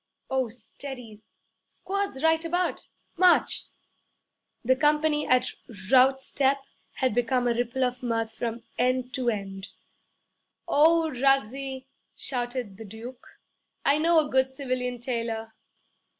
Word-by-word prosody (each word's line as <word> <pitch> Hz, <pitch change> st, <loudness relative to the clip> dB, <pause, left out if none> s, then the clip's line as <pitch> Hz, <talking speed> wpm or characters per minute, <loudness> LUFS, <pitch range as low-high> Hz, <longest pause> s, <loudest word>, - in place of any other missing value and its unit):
Oh, 260 Hz, -3 st, +1 dB
steady! 235 Hz, -1 st, -9 dB, 0.5 s
Squads 395 Hz, -8 st, -4 dB
right 320 Hz, 0 st, +3 dB
about! 350 Hz, +2 st, -1 dB, 0.3 s
March!' 365 Hz, 0 st, +4 dB, 1.0 s
The 260 Hz, +2 st, +4 dB
company, 300 Hz, +1 st, +2 dB
at 255 Hz, 0 st, +3 dB, 0.4 s
route 265 Hz, +1 st, +5 dB
step, 275 Hz, 0 st, +2 dB, 0.4 s
had 260 Hz, -4 st, 0 dB
become 245 Hz, +1 st, +1 dB
a 240 Hz, -, +3 dB
ripple 245 Hz, +2 st, -1 dB
of 250 Hz, 0 st, -1 dB
mirth 225 Hz, -2 st, -1 dB
from 230 Hz, 0 st, -4 dB, 0.2 s
end 255 Hz, 0 st, +1 dB
to 255 Hz, -3 st, 0 dB
end. 195 Hz, -3 st, -4 dB, 1.0 s
'O 320 Hz, +2 st, +4 dB
Ruggsie!' 270 Hz, 0 st, 0 dB, 0.3 s
shouted 245 Hz, -5 st, -4 dB
the 225 Hz, -, -9 dB
Duke, 225 Hz, +5 st, -10 dB, 0.6 s
'I 285 Hz, +2 st, +4 dB
know 335 Hz, +2 st, +4 dB
a -, -, -11 dB
good 260 Hz, 0 st, +3 dB
civilian 255 Hz, -2 st, -3 dB
tailor!' 230 Hz, -2 st, -3 dB
255 Hz, 120 wpm, -27 LUFS, 235-275 Hz, 1.0 s, route